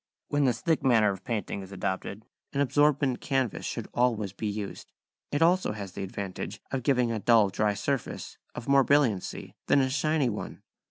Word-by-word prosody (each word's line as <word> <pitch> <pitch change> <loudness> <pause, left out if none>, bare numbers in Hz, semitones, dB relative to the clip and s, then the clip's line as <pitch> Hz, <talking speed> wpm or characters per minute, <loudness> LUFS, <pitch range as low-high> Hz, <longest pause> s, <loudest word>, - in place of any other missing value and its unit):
When 145 -1 +2
this 125 -2 +1
thick 160 -2 +1
manner 115 -5 +4
of 95 - -7
painting 105 -3 -3
is 95 0 -10
adopted, 100 +2 -4 0.3
an 140 - -1
absorbent 145 -1 +2
canvas 135 -6 -1
should - - -4
always 110 -6 +1
be 105 +2 -4
used. 105 -1 -5 0.4
It 145 +3 +2
also 175 -8 +3
has 100 -3 -6
the - - -6
advantage 95 0 -5
of 135 - -1
giving 125 -2 +2
a 110 - -1
dull 110 -2 +5
dry 105 +1 +1
surface 135 +5 -3 0.2
of 120 - -7
more 140 0 +5
brilliancy 130 -9 +1
than 145 - +5
a 130 -1 +1
shiny 150 0 +1
one. 105 -3 -5
120 Hz, 180 wpm, -28 LUFS, 105-140 Hz, 0.4 s, dull